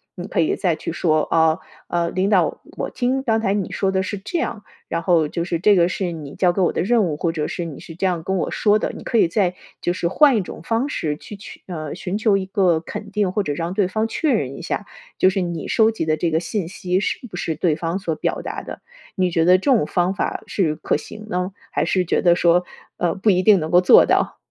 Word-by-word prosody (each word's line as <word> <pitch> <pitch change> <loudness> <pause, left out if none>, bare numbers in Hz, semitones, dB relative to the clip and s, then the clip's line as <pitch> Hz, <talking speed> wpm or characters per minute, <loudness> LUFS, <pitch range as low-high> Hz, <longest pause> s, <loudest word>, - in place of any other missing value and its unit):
你 180 0 -6
可 - - -2
以 160 - +1
再 175 -5 0
去 - - -5
说 155 -2 +1
啊， 160 +1 +2 0.3
呃， 170 -1 0
“领 190 +2 0
导， 180 -7 +2 0.2
我 - - -3
听 255 +1 -1
刚 225 -4 +2
才 200 -3 0
你 200 -3 -2
说 195 -1 0
的 190 0 +1
是 190 +2 -4
这 215 - -3
样， 215 -9 -3 0.2
然 165 - -2
后 165 -3 +3
就 170 +3 -3
是 170 -1 -2
这 205 +3 +5
个 175 -1 +4
是 180 -2 -2
你 150 -4 -8
交 180 -2 +2
给 190 - 0
我 175 - +3
的 - - -1
任 230 +3 +3
务“， 160 -5 -2
或 165 -2 0
者 150 -2 -2
是” 175 - -4
你 150 - -9
是 165 - -10
这 180 - -2
样 175 -3 -1
跟 190 +2 -1
我 - - -1
说 210 0 +2
的”， - - -2
你 - - -9
可 235 - 0
以 215 - +5
再 180 +1 +1 0.3
就 175 - 0
是 175 -1 -1
换 270 - +5
一 - - +1
种 180 - -8
方 230 +4 0
式 155 - -2
去 210 - -10
取 200 - -12
呃， 155 -5 -5
寻 185 +2 -3
求 215 -2 +3
一 190 - -3
个 190 -4 +2
肯 205 +5 -8
定， 205 -3 0
或 210 - 0
者 150 - -2
让 165 +4 -3
对 190 -2 +1
方 220 +3 0
确 295 +6 0
认 140 - -1
一 - - -8
下。 - - -3 0.3
就 185 - +5
是 190 0 -1
你 170 -3 -4
收 220 0 +3
集 220 -7 -3
的 155 -1 +2
这 165 +2 -1
个 160 - +2
信 175 0 -3
息 185 -1 -1
是 - - -1
不 180 - -9
是 170 -2 -2
对 160 0 +1
方 165 +3 -3
所 170 -5 -2
表 155 - -2
达 - - -5
的， - - -8 0.4
你 185 -1 +1
觉 165 -1 +2
得 180 +2 +6
这 185 - -10
种 245 - +4
方 180 +4 0
法 195 - -3
是 165 -6 0
可 - - -1
行 215 +8 -7
呢， 180 0 -2 0.2
还 - - +1
是 185 -1 +1
觉 - - +1
得 175 -1 +4
说， 175 +1 +4 0.3
呃， 175 - 0
不 195 +3 +1
一 185 -2 +3
定 205 -1 +6
能 155 -1 -3
够 175 +1 +5
做 180 - +7
到？ - - +1
180 Hz, 285 characters per minute, -21 LUFS, 165-205 Hz, 0.4 s, 做